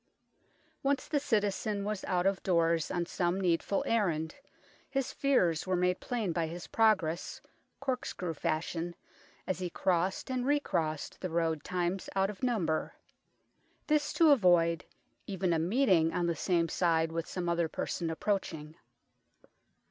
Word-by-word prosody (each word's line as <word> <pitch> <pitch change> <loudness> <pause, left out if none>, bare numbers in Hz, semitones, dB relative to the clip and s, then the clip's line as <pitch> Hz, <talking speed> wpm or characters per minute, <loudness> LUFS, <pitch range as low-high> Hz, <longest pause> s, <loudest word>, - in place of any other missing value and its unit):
Once 275 -1 0
the 295 - +1
citizen 210 -4 0
was 210 -2 -3
out 180 -1 0
of 195 -1 +1
doors 165 -3 +2
on 175 -1 -1
some 175 +2 -1
needful 180 +1 +1
errand, 170 -8 0 0.6
his 270 -1 -2
fears 185 - +2
were 185 - +2
made 180 0 +1
plain 225 -7 -2
by 165 -1 0
his 170 +2 -7
progress, 185 -7 +1 0.4
corkscrew 250 -10 -3
fashion, 165 +3 -2 0.5
as 185 - -2
he 180 -1 -2
crossed 185 +7 0
and 255 0 -1
recrossed 170 - -1
the 185 - -2
road 165 -2 0
times 180 +1 -2
out 195 +1 +2
of 200 - -14
number. 195 -11 0 0.9
This 300 -1 +1
to 325 -3 +6
avoid 175 - +4 0.4
even 190 -3 0
a 165 - +1
meeting 180 -3 +3
on 175 - +1
the 170 -1 0
same 170 +1 +1
side 165 -2 +1
with 165 0 -3
some 180 -2 -4
other 170 -1 +1
person 165 +1 -3
approaching. 160 -4 -2
180 Hz, 140 wpm, -31 LUFS, 165-210 Hz, 0.9 s, to